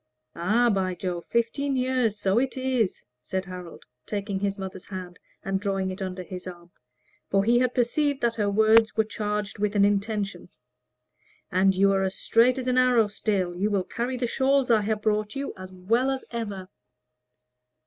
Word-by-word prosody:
"Ah, 225 Hz, +8 st, +2 dB
by 185 Hz, -2 st, 0 dB
Jove! 175 Hz, -1 st, -4 dB
fifteen 270 Hz, +4 st, 0 dB
years 255 Hz, -4 st, +1 dB
so 195 Hz, +2 st, +2 dB
it 265 Hz, +1 st, -2 dB
is!" 255 Hz, -6 st, -1 dB, 0.2 s
said 190 Hz, +7 st, -3 dB
Harold, 180 Hz, -2 st, -9 dB, 0.2 s
taking 200 Hz, -1 st, -3 dB
his 200 Hz, 0 st, -1 dB
mother's 190 Hz, -1 st, -7 dB
hand 185 Hz, -2 st, -7 dB, 0.3 s
and 195 Hz, 0 st, 0 dB
drawing 195 Hz, -2 st, -1 dB
it 185 Hz, +2 st, -8 dB
under 185 Hz, -1 st, -4 dB
his 180 Hz, 0 st, -8 dB
arm; 175 Hz, -1 st, -10 dB, 0.6 s
for 195 Hz, 0 st, +3 dB
he 235 Hz, +3 st, +4 dB
had 250 Hz, 0 st, +1 dB
perceived 280 Hz, +3 st, +1 dB
that 235 Hz, -1 st, +2 dB
her 205 Hz, -2 st, +1 dB
words 220 Hz, +2 st, +4 dB
were 220 Hz, -, +5 dB
charged 210 Hz, -1 st, -3 dB
with 210 Hz, 0 st, 0 dB
an 200 Hz, -1 st, +5 dB
intention. 205 Hz, 0 st, -1 dB, 1.0 s
"And 190 Hz, +1 st, +3 dB
you 195 Hz, +1 st, +4 dB
are 195 Hz, 0 st, +2 dB
as 190 Hz, 0 st, -1 dB
straight 245 Hz, +3 st, +3 dB
as 260 Hz, -, -3 dB
an 255 Hz, 0 st, +3 dB
arrow 250 Hz, -3 st, +4 dB
still; 200 Hz, -3 st, -1 dB
you 200 Hz, +4 st, 0 dB
will 200 Hz, -3 st, +1 dB
carry 240 Hz, +7 st, -3 dB
the 245 Hz, -, -1 dB
shawls 265 Hz, +1 st, +2 dB
I 220 Hz, -2 st, +5 dB
have 210 Hz, 0 st, -2 dB
brought 215 Hz, +1 st, 0 dB
you 275 Hz, 0 st, -4 dB
as 185 Hz, 0 st, -10 dB
well 225 Hz, +8 st, +1 dB
as 265 Hz, -1 st, -3 dB
ever." 205 Hz, -5 st, -5 dB
210 Hz, 180 wpm, -26 LUFS, 190-235 Hz, 1.0 s, were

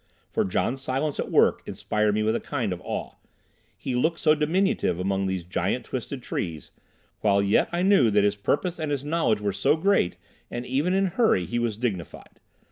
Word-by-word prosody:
For -, -, +1 dB
John 120 Hz, +7 st, -1 dB
Silence 135 Hz, +3 st, -2 dB
at -, -, -2 dB
work -, -, +3 dB
inspired 105 Hz, -1 st, 0 dB
me 110 Hz, -, +1 dB
with 110 Hz, +1 st, +1 dB
a -, -, 0 dB
kind 120 Hz, -10 st, -2 dB
of 90 Hz, -, -8 dB
awe. -, -, -5 dB, 0.6 s
He 130 Hz, -, -4 dB
looked 160 Hz, +7 st, +1 dB
so 155 Hz, -2 st, +4 dB
diminutive 155 Hz, -, +1 dB
among 95 Hz, +1 st, 0 dB
these 95 Hz, -2 st, -2 dB
giant 90 Hz, -, -2 dB
twisted -, -, -5 dB
trees, 80 Hz, -3 st, -4 dB, 0.5 s
while 100 Hz, -2 st, +3 dB
yet 100 Hz, +1 st, +2 dB
I 175 Hz, +1 st, 0 dB
knew 190 Hz, -, +5 dB
that 105 Hz, -1 st, +3 dB
his 105 Hz, 0 st, +2 dB
purpose 165 Hz, -, -1 dB
and 155 Hz, -1 st, -2 dB
his 140 Hz, -1 st, -2 dB
knowledge 150 Hz, -9 st, +1 dB
were 100 Hz, -1 st, -1 dB
so 100 Hz, +9 st, +2 dB
great, 160 Hz, -, +1 dB, 0.3 s
and 120 Hz, +1 st, -5 dB
even 145 Hz, +9 st, 0 dB
in 195 Hz, 0 st, +3 dB
hurry 190 Hz, -, +2 dB
he 120 Hz, +5 st, -2 dB
was 115 Hz, -3 st, -1 dB
dignified. 105 Hz, -8 st, -5 dB
120 Hz, 195 wpm, -25 LUFS, 100-155 Hz, 0.6 s, knew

